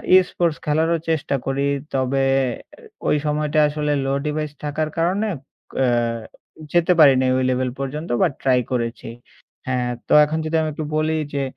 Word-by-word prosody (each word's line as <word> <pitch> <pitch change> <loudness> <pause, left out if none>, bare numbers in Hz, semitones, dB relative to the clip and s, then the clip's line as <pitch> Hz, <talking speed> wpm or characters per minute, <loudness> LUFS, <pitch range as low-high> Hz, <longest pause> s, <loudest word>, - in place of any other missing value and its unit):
Esports 175 -3 +2
খেলারও 160 +3 +2
চেষ্টা 155 -3 0
করি। 135 +1 0 0.3
তবে 135 0 +1 0.5
আ - - -18 0.3
ওই - - +3
সময়টা 150 0 0
আসলে 150 0 -2
লো 135 - 0
ডিভাইস 150 0 -2
থাকার 150 +1 -2
কারণে 185 +6 +1 0.5
এ্যা 130 - +3 0.9
যেতে 175 0 +3
পারি 145 -3 +8
নাই 130 0 +2
ওই 130 - +1
লেভেল 130 0 0
পর্যন্ত 150 +4 -4
বা - - +5
ট্রাই 130 -2 +3
করেছি। 115 -2 -3 0.6
হ্যাঁ, 125 -1 -1 0.2
তো - - +1
এখন 155 +2 -3
যদি 155 +1 -2
আমি 155 - -1
একটু 155 +1 -4
বলি 155 +1 +1 0.2
যে 140 -1 -1
150 Hz, 160 wpm, -21 LUFS, 135-160 Hz, 0.9 s, পারি